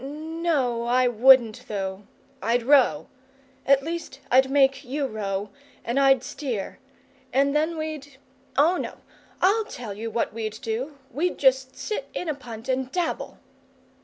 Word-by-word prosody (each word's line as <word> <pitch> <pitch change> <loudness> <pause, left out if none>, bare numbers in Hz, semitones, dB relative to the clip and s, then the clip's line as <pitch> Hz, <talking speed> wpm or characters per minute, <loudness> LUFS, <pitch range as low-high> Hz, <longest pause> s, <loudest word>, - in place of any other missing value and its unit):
No, 300 -5 -1
I 250 +1 +3
wouldn't 245 -1 +5
though; 195 -1 -4 0.3
I'd 235 +1 +1
row 245 - +4 0.6
at 275 0 +5
least 330 -3 -5
I'd 265 +1 +5
make 270 -1 +3
you 280 +2 -2
row, 205 -4 -3 0.3
and 240 +4 0
I'd 270 -2 +4
steer. 245 -11 -5 0.5
And 275 +2 +2
then 315 +2 +1
we'd 305 -3 -6 0.4
Oh, 325 +6 +4
no! - - -6 0.4
I'll 420 +4 +4
tell 240 - -7
you 220 +3 -5
what 225 -1 -1
we'd 220 -1 -4
do! 255 +6 -3
We'd 335 +8 -1
just 265 -1 +2
sit 425 -11 -4
in 355 - -3
a 310 - 0
punt 240 -4 -10
and 260 0 -1
dabble!" 350 -3 -2
265 Hz, 145 wpm, -25 LUFS, 230-295 Hz, 0.6 s, wouldn't